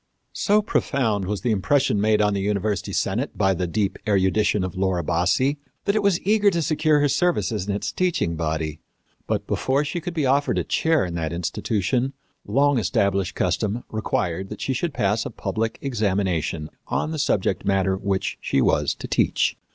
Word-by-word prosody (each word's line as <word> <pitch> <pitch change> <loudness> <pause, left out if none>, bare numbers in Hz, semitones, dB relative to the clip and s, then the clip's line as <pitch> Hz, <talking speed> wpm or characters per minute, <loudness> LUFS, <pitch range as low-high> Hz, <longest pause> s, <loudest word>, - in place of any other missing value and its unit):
So 210 +1 +2
profound 115 - 0
was 100 +1 -3
the 120 - 0
impression 105 +1 +2
made 105 0 +3
on 105 0 +2
the 100 - -1
university 100 0 -1
senate - - -1
by 95 0 +3
the 90 0 -2
deep 100 +2 -1
erudition 100 0 +2
of 95 +1 -4
Laura 95 -2 0
Bassi 90 - +1 0.3
that 200 - +1
it 215 - +2
was 200 -4 +2
eager 210 +1 +4
to 170 -4 0
secure 155 0 +2
her 145 - +4
services 130 - 0
in 100 - 0
its 105 - -3
teaching 175 - 0
body. 80 -1 -2 0.5
But, - - -1
before 135 +3 0
she 170 +4 -3
could 175 0 -5
be 155 -4 +1
offered 140 +2 +2
a - - +1
chair 160 -8 +1
in 90 - -5
the 80 -2 -2
institution, 110 +9 -1 0.3
long 140 -1 +3
established 100 -1 0
custom 110 +3 -1
required 95 -4 -2
that 105 - -8
she 135 - -1
should 170 +6 -1
pass 105 +3 +1
a - - -4
public 110 0 -3
examination 95 - -1 0.2
on 155 - -1
the 160 - -3
subject 95 -7 0
matter 95 -1 +1
which 95 +1 -2
she - - 0
was - - +2
to - - -7
teach. - - +1
105 Hz, 180 wpm, -23 LUFS, 95-140 Hz, 0.5 s, eager